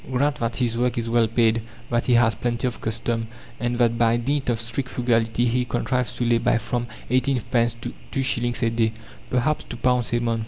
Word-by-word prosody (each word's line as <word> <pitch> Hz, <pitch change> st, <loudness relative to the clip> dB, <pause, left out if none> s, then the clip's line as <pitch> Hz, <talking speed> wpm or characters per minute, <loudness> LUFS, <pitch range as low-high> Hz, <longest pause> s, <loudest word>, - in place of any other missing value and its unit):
Grant 140 Hz, +2 st, +1 dB
that 115 Hz, -1 st, -2 dB
his 120 Hz, -2 st, 0 dB
work 125 Hz, 0 st, +1 dB
is 115 Hz, 0 st, -2 dB
well 115 Hz, -1 st, +4 dB
paid, 115 Hz, 0 st, +2 dB, 0.3 s
that 120 Hz, 0 st, +1 dB
he 125 Hz, -, +4 dB
has 120 Hz, -2 st, +4 dB
plenty 120 Hz, +1 st, -2 dB
of 125 Hz, -2 st, -3 dB
custom, 115 Hz, +1 st, -1 dB, 0.3 s
and 120 Hz, +1 st, -1 dB
that 115 Hz, -1 st, +2 dB
by 115 Hz, 0 st, +4 dB
dint 135 Hz, +3 st, -1 dB
of 115 Hz, -2 st, +1 dB
strict 120 Hz, +3 st, -3 dB
frugality 115 Hz, -1 st, +1 dB
he 125 Hz, +1 st, +1 dB
contrives 125 Hz, +1 st, -1 dB
to 120 Hz, -, -1 dB
lay 120 Hz, 0 st, +3 dB
by 115 Hz, -, +2 dB
from 120 Hz, +2 st, -2 dB, 0.2 s
eighteen 130 Hz, +1 st, +2 dB
pence 120 Hz, -2 st, +2 dB
to -, -, -5 dB, 0.2 s
two 135 Hz, -, -1 dB
shillings 120 Hz, -1 st, 0 dB
a 115 Hz, -, +2 dB
day, 115 Hz, -1 st, +1 dB, 0.4 s
perhaps 130 Hz, +5 st, +1 dB
two 120 Hz, -, -8 dB
pounds 125 Hz, -1 st, +1 dB
a 120 Hz, -, +3 dB
month. 115 Hz, -1 st, 0 dB
120 Hz, 220 wpm, -24 LUFS, 115-125 Hz, 0.4 s, well